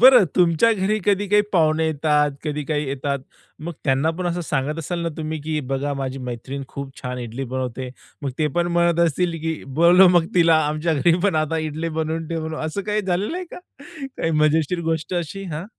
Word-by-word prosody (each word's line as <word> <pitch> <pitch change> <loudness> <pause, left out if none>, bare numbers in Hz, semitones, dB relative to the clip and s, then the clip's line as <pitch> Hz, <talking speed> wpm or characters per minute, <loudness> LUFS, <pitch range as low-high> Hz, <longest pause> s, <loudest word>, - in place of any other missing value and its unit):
बरं 250 -3 +8
तुमच्या 175 +5 +4
घरी 210 +1 0
कधी 205 0 +2
काही 210 +1 +5
पाहुणे 160 -2 +3
येतात, 150 -1 +2
कधी 150 -1 -2
काही 150 -1 -1
येतात. 140 +1 -2 0.4
मग 170 +3 -5
त्यांना 135 +3 +2
पण 180 - -2
असं 175 0 -1
सांगत 150 0 -2
असाल 170 +2 -3
ना 170 - 0
तुम्ही, 155 -1 -4
की 155 0 -2
"बघा 140 +1 -1
माझी 135 -1 -4
मैत्रीण 130 +4 -6
खूप 140 -1 -7
छान 125 -1 -4
इडली 120 +2 -5
बनवते." 130 0 -3 0.3
मग 140 - -2
ते 155 - +2
पण 175 - +2
म्हणत 170 -1 +3
असतील, 170 +3 0
की 160 -1 -2 0.2
"बोलवा 180 +3 +8
मग 165 - -1
तिला 165 -2 +5
आमच्या 155 +2 0
घरी 165 +4 +3
पण 200 -3 +2
आता 160 +2 -2
इडली 160 +2 -3
बनवून 160 +1 -2
ठेवून." 160 -1 -3
असं 160 +6 -3
काही 210 +1 -1
झालेलं 195 - -1
आहे 365 - -4
का, - - -8 0.6
काही 165 - -1
मजेशीर 160 +3 +2
गोष्ट 160 +2 -2
अशी? 175 +3 -3
हां. 155 +3 -4
160 Hz, 200 wpm, -22 LUFS, 145-175 Hz, 0.6 s, बरं